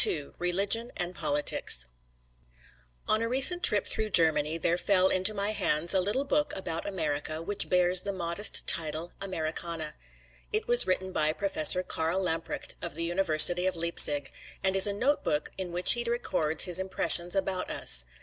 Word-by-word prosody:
XXII 145 -3 -2
RELIGION 200 +7 -1
AND 175 0 -4
POLITICS 145 - -2 1.2
On 215 - +1
a 230 - -3
recent 270 +8 +6
trip 210 - +4
through 215 0 0
Germany 160 -3 +1
there 165 +1 -1
fell 190 0 +1
into 185 +3 +2
my 205 0 -2
hands 170 -5 -1
a 190 - +1
little 205 +9 -2
book 295 +1 -2
about 170 -3 -6
America 155 -4 -4
which 200 +5 +1
bears 180 0 +3
the 200 - -4
modest 180 +2 0
title, 160 +1 -1
"Americana." 165 -3 -5 0.6
It 430 0 -3
was 485 0 +4
written 185 0 -2
by 155 -3 0
Professor 185 -2 +3
Karl 165 +1 -3
Lamprecht 165 -3 -4
of - - -7
the 165 - -5
University 175 0 +3
of 185 - -3
Leipzig, 165 -3 0 0.3
and 190 0 0
is 195 +2 +6
a 200 - -3
note 265 +8 -2
book 150 - -3
in 185 -2 -7
which 180 +1 +7
he 240 - -2
records 165 -10 -1
his 180 -1 0
impressions 185 -1 -3
about 190 -1 -3
us. 60 - +2
180 Hz, 170 wpm, -27 LUFS, 165-200 Hz, 1.2 s, which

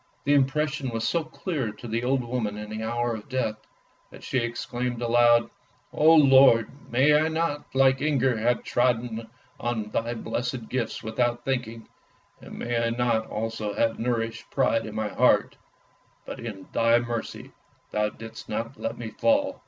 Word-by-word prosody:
The 145 - +2
impression 140 0 +1
was 115 -1 -2
so 165 +7 +1
clear 155 - -3
to 120 - -10
the 115 +1 -2
old 130 0 +1
woman 115 -4 -3
in 105 0 -7
the 110 0 -4
hour 120 +1 -1
of 110 +2 -8
death, 120 -5 -1 0.5
that - - -14
she 130 - 0
exclaimed 120 +1 -3
aloud, 120 0 +4 0.2
" - - -37
Oh 160 +2 +6
Lord, 135 -6 +6 0.2
may 135 +5 +4
I 155 +1 +4
not, 160 -3 -2
like 135 0 +4
Inger, 135 -4 +2
have 120 +2 +1
trodden 120 -2 0 0.3
on 115 -4 -3
thy 115 +1 -1
blessed 120 +1 -4
gifts 125 -3 -3
without 120 +2 -1
thinking; 120 -4 -3 0.5
and - - -10
may 120 -1 -1
I 115 - +1
not 115 -1 0
also 110 -1 -3
have 115 +1 0
nourished 115 -1 -2
pride 115 -4 +1
in 105 - -8
my 110 -1 -1
heart, - - +3 0.7
but - - -7
in 105 -5 -7
Thy 115 0 +4
mercy 120 -1 -4 0.4
Thou 105 0 +1
didst 110 +1 -11
not 115 +4 -4
let - - -3
me 115 -2 -6
fall! 285 0 +1
120 Hz, 170 wpm, -26 LUFS, 115-130 Hz, 0.7 s, Oh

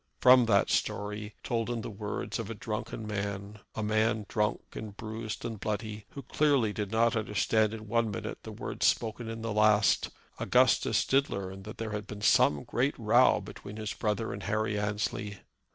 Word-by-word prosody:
From 125 -2 +7
that 100 -3 +3
story, 105 +1 -2
told 115 -1 -1
in 120 -2 -2
the 115 - -6
words 105 +1 -4
of 115 -2 -4
a 115 - -4
drunken 110 +1 -5
man, 100 0 -4 0.2
a 110 - -2
man 110 0 +1
drunk, 105 0 0
and 105 -2 -7
bruised, 110 0 -5
and 115 -3 -4
bloody, 110 0 -4
who 140 - -7
clearly 135 -5 +2
did 105 -2 -3
not 115 +2 +2
understand 110 0 +1
in 110 -1 -7
one 115 0 +1
minute 100 - -5
the - - -8
words - - -1
spoken 115 +1 0
in 115 0 -6
the 115 -2 -2
last, 105 -1 +4 0.3
Augustus - - +3
did 140 +1 +2
learn 95 0 -5
that 105 +2 -9
there 110 -1 -4
had 105 -1 -4
been 105 -1 -7
some 75 -1 +4
great - - 0
row - - +4
between 105 +2 -9
his 110 -1 -3
brother 105 +1 -1
and - - -6
Harry 110 0 -1
Annesley. 105 0 -2
110 Hz, 185 wpm, -30 LUFS, 105-115 Hz, 0.3 s, From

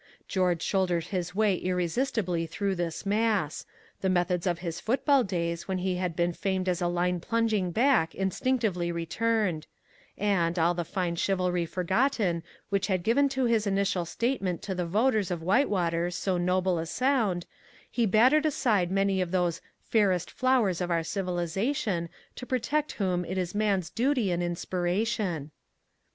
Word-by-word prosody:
George 180 -3 +1
shouldered 180 -4 +1
his 180 0 -4
way 210 -1 +3
irresistibly 180 0 -1
through 200 +3 -1
this 175 0 -3
mass; 205 -6 0 0.3
the 190 - +1
methods 180 0 +1
of 175 -1 +1
his 170 -1 -5
football 270 +3 +2
days 170 -4 -3
when 190 -1 -1
he 185 0 -1
had 180 -2 -2
been 175 0 +1
famed 190 0 -2
as 180 0 0
a 175 - +2
line 175 +1 0
plunging 220 -1 0
back 225 -5 +2
instinctively 190 -2 0
returned 180 0 -1 0.5
and, 180 -4 +1
all 170 +1 +3
the 175 0 -2
fine 175 0 -2
chivalry 180 -1 0
forgotten 190 - 0 0.3
which 200 -1 0
had 185 -4 0
given 275 +7 +3
to 265 -1 0
his 225 -3 +2
initial 195 -2 +1
statement 190 -1 -2
to 195 - -3
the 180 -2 -2
voters 215 +1 +2
of 170 -3 -3
Whitewater 175 - +1
so 185 +2 -1
noble 180 0 +1
a 165 - -3
sound, 225 -6 +1 0.5
he 235 -2 +1
battered 255 +10 +4
aside 220 - +1
many 195 0 +1
of 180 - -1
those 175 -2 0 0.2
"fairest 195 -6 +1
flowers 245 -9 +2
of 180 - -1
our 165 -1 +1
civilization, 180 - -1 0.3
to 250 - -8
protect 285 +5 -1
whom 180 -3 0
it 185 +2 -4
is 180 -1 -2
man's 200 -5 0
duty 245 -4 +1
and 175 0 0
inspiration." 175 -1 -1
185 Hz, 155 wpm, -28 LUFS, 175-215 Hz, 0.5 s, battered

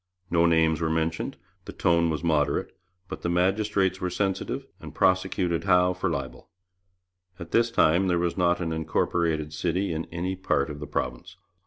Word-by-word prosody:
No 85 0 +4
names 80 -1 +3
were 80 - +1
mentioned; 80 +1 -2 0.3
the - - -7
tone 85 -1 +2
was 80 0 -3
moderate; 75 -4 0 0.3
but - - -7
the 85 - -2
magistrates 95 +1 +1
were 90 - -1
sensitive 95 +1 -2
and - - -10
prosecuted 95 -2 +1
Howe 90 -1 +4
for 90 +1 -2
libel. 70 -5 -5 0.9
At 85 -3 -9
this 115 0 +3
time 95 -4 +3
there 90 -1 +2
was 85 0 0
not 90 -1 +2
an 80 -2 -2
incorporated 80 -1 -1
city 90 +3 -1
in 80 +1 -3
any 90 +3 -3
part 75 -6 0
of 75 - -8
the 75 - -6
province. - - -4
85 Hz, 170 wpm, -26 LUFS, 80-95 Hz, 0.9 s, No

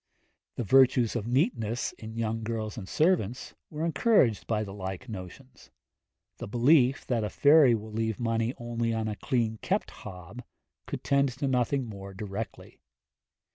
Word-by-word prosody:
The - - -2
virtues 125 +1 +4
of 115 -2 -2
neatness, 120 - 0
in 110 0 -10
young 115 0 -1
girls 110 -1 -4
and 100 -5 -8
servants, 150 - +1 0.2
were 155 +1 -3
encouraged 160 - +2
by 110 -2 0
the 100 -2 -7
like 95 +4 -6
notions; 110 +5 -10 0.7
the - - -5
belief 125 +4 +3
that 120 -3 0
a 105 - -2
fairy 145 -3 +6
will 110 0 -7
leave 110 0 -2
money 115 +1 0
only 115 -1 -2
on 110 -1 -1
a 105 - -3
clean 115 -3 -1
kept - - -1
hob, 90 +6 -9 0.5
could - - -5
tend 140 0 +2
to 140 0 -1
nothing 130 +1 +1
more 100 -3 -9
directly. 105 +2 -7
115 Hz, 155 wpm, -28 LUFS, 110-130 Hz, 0.7 s, fairy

